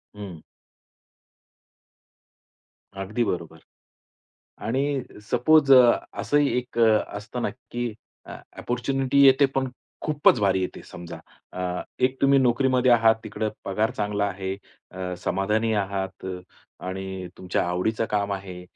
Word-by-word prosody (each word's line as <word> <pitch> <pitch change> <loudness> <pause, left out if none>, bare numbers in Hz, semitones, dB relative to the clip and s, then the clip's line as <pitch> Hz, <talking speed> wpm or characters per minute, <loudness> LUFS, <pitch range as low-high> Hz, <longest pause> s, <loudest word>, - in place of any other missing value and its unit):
हं. 95 -6 -8 2.6
अगदी 105 +5 -1
बरोबर. 85 -5 -4 1.0
आणि 135 +3 -1 0.3
सपोज 140 +3 +4
अ, 125 -2 +7 0.2
असंही 140 +6 +2
एक 125 -1 -5
अ, 110 -2 +5
असतं 120 +4 -6
ना 105 - 0 0.2
की 120 -2 -3 0.3
अ, - - -8 0.2
अपॉर्च्युनिटी 135 +3 0
येते 135 +1 +6
पण 130 -1 0 0.3
खूपच 145 -5 +3
भारी 95 -2 +2
येते 90 - -4
समजा. 85 -1 -9 0.4
अ, 90 -1 -3 0.2
एक 130 +1 +2
तुम्ही 140 0 +5
नोकरीमध्ये 130 0 +3
आहात 115 -1 +5
तिकडे 110 -1 -3 0.2
पगार 105 +3 0
चांगला 105 -1 0
आहे. 95 -1 -3 0.4
अ, 90 0 -5
समाधानी 105 +5 0
आहात 95 -2 -3 0.6
आणि 95 0 -5
तुमच्या 90 -1 -1
आवडीचं 100 +6 0
काम 100 -1 0
आहे 95 -2 -7
110 Hz, 120 wpm, -25 LUFS, 95-125 Hz, 2.6 s, अ